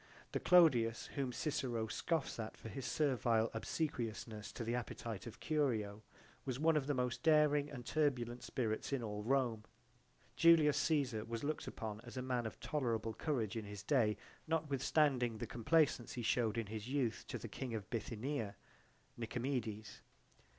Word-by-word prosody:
The - - 0
Clodius 125 -11 +5
whom 135 -3 -1
Cicero 130 -5 -1
scoffs 150 +4 -1
at 110 -1 -5
for 115 - -8
his 135 +2 -5
servile 120 -6 +2
obsequiousness 115 -4 -3
to - - -4
the 115 +1 -1
appetite 115 -3 -4
of 115 - -9
Curio 115 -9 0 0.4
was 130 -1 -3
one 160 +1 +4
of 145 -3 +1
the 145 - +1
most 125 -1 -1
daring 150 -1 +4
and 125 -4 -8
turbulent 125 -6 0
spirits 110 -1 -2
in 135 -3 0
all 105 -1 -3
Rome. 120 -2 +1 0.7
Julius 155 0 +6
Caesar 135 -9 +1
was 115 +2 -4
looked 155 +1 -2
upon 110 -1 -5
as 120 +1 -9
a 125 - -2
man 125 -3 0
of 110 - -9
tolerable 115 -7 -1
courage 120 -6 -1
in 110 -2 -3
his 105 -1 -7
day, 110 -4 +3 0.3
notwithstanding 140 -5 +2
the - - -3
complaisance 125 0 +2
he 120 - -4
showed 115 -1 +1
in 115 - 0
his 110 +2 -6
youth 130 -5 0
to - - -3
the - - -6
King 125 -4 -4
of 105 -2 -5
Bithynia, 115 0 -3 0.6
Nicomedes. 115 -3 -3
120 Hz, 160 wpm, -37 LUFS, 110-145 Hz, 0.7 s, Julius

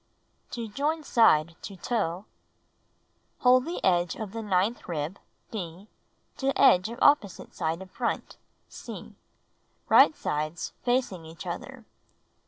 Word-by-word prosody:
To 235 -2 -5
Join 295 +8 -1
Side 165 - +4
to 195 - -8
Toe 190 -3 -2 1.2
Hold 255 +1 +5
the 340 +2 -5
edge 175 -2 +2
of 215 -3 -6
the 225 +1 -5
ninth 205 +2 0
rib 160 +3 -3 0.3
(D) 190 -1 -7 0.5
to 275 0 -1
edge 185 +4 +6
of 235 - -7
opposite 250 -10 +3
side 165 +2 -2
of 185 - -16
front 235 0 -3 0.3
(C), - - -9 0.8
right - - +7
sides 155 +2 -3
facing 245 -8 0
each 160 0 -10
other. - - -7
200 Hz, 125 wpm, -27 LUFS, 170-245 Hz, 1.2 s, right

